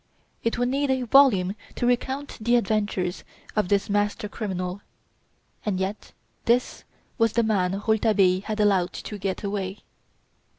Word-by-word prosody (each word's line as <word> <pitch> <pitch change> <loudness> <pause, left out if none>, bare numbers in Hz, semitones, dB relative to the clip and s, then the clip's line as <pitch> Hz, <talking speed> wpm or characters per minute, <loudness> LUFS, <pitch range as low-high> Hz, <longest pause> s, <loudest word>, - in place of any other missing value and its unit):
It 230 - 0
would 245 +1 +1
need 280 +2 0
a 260 -1 +1
volume 225 -7 +5 0.2
to - - -1
recount 265 +3 -1
the 235 +3 +3
adventures 205 -5 0 0.3
of 210 -3 +1
this 200 -1 +2
master 205 0 0
criminal. 190 -3 -4 0.8
And 200 -3 -1
yet 195 +3 -4 0.3
this 245 +2 +1 0.3
was 225 -1 +3
the 235 - +3
man 195 -4 +1
Rouletabille 205 -4 +3
had 215 -1 -3
allowed 195 -4 +2
to 210 - -7
get 195 +1 -3
away! 200 -1 -3
210 Hz, 140 wpm, -25 LUFS, 190-235 Hz, 0.8 s, volume